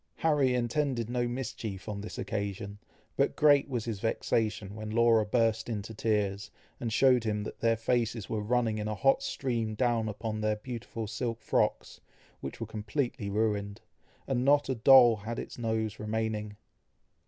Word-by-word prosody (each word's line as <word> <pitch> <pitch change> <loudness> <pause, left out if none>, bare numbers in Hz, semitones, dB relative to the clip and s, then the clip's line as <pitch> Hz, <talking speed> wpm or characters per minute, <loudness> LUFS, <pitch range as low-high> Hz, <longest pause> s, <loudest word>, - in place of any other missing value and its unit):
Harry 145 -5 +2
intended 120 -1 -1
no 120 -1 0
mischief 115 -5 -5
on 100 -2 -4
this 105 - -7
occasion, 100 0 -4 0.4
but - - +1
great 145 -1 +5
was 120 -4 -2
his 110 -4 -3
vexation 110 -2 -1
when 110 0 -6
Laura 115 0 +4
burst 110 +1 +1
into 110 0 -4
tears, 105 -3 -1 0.3
and 115 -2 -3
showed 125 0 +4
him 105 -2 -1
that - - -7
their 115 0 +2
faces 115 -1 0
were 110 - -2
running 115 0 0
in 105 - -3
a 110 - -2
hot 135 +5 +3
stream 115 -5 -2
down 115 -1 +1
upon 110 +1 -4
their 110 0 +1
beautiful 115 0 -6
silk 115 +2 -3
frocks, - - -1 0.4
which - - -7
were - - -3
completely 110 0 -3
ruined, 100 -1 -1 0.5
and 125 -2 0
not 145 +1 +4
a - - +2
doll 120 -1 +7
had 110 +3 -5
its - - -7
nose 110 -2 -2
remaining. 105 -1 -3
110 Hz, 165 wpm, -30 LUFS, 105-120 Hz, 0.5 s, doll